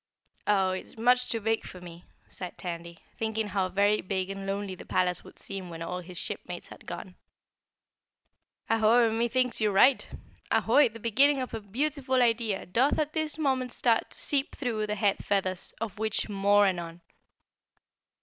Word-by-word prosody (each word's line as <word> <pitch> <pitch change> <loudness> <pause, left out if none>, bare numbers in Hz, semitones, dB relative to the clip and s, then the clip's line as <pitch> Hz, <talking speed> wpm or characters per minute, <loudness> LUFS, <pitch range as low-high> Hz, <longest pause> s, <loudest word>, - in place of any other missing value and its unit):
"Oh, 195 -2 +3
it's 185 +4 -6
much 250 +2 +3
too 230 - 0
big 225 +1 0
for 180 - -9
me," 175 -1 -11 0.2
sighed 180 -2 -8
Tandy, 170 -1 -6 0.2
thinking 220 -1 -1
how 190 -1 0
very 200 +3 +2
big 190 0 -2
and 195 0 -6
lonely 200 0 -2
the 185 - -9
palace 180 -1 0
would - - -15
seem 195 -2 -4
when 165 -1 -6
all 180 +2 -4
his 180 0 -7
shipmates - - -5
had - - -13
gone. - - -7 1.5
"Aho, 225 +2 +4
and 225 +1 -2
methinks 240 +1 +1
you 215 - +3
are - - -2
right! 255 +7 +5 0.4
Ahoy, 290 -4 +4
the 230 +1 -11
beginning 270 +6 +4
of 255 -1 -4
a 225 - -4
beautiful 260 +5 0
idea 230 -4 +1
doth 250 +10 +2
at 305 0 -1
this 315 -2 -2
moment 260 -5 0
start 230 -2 +2
to - - -10
seep 280 -1 0
through 225 -6 -2
the 210 - -1
head 200 -1 +1
feathers, 185 -2 -1
of 210 -3 -5
which, 220 -1 -1
more 205 0 +4
anon!" 175 -3 -2
210 Hz, 175 wpm, -28 LUFS, 190-245 Hz, 1.5 s, right